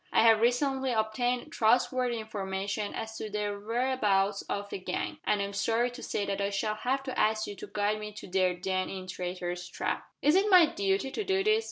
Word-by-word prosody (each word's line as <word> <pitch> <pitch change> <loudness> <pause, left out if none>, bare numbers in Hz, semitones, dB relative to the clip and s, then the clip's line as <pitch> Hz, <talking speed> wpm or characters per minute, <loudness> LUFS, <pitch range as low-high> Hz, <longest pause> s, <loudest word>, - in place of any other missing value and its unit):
I - - +4
have 225 -1 +6
recently 265 +2 +2
obtained 240 +3 0
trustworthy 245 +2 +2
information 205 -1 -3
as 220 0 -5
to 215 - -5
the 210 0 -2
whereabouts 210 -4 +1
of 200 0 -2
the - - -4
gang, 185 - -3
and 205 -1 +2
I - - +1
am 200 0 -5
sorry 230 +4 +1
to 245 - -10
say 205 - -2
that 200 0 -2
I 200 - +1
shall 200 +2 -1
have 260 +5 -1
to 260 -1 -4
ask 215 0 +2
you 205 - -6
to - - -8
guide 205 +1 0
me 210 0 -6
to 210 - -9
their 185 -1 +2
den 185 +1 -1
in 190 -1 -6
Traitor's 180 -1 -4
Trap." 175 - -3 0.2
"Is 295 - +5
it 395 +2 +4
my 365 -4 +8
duty 200 -1 -1
to 430 - -2
do 385 -1 +1
this?" 430 +1 +4
215 Hz, 215 wpm, -29 LUFS, 195-245 Hz, 0.2 s, my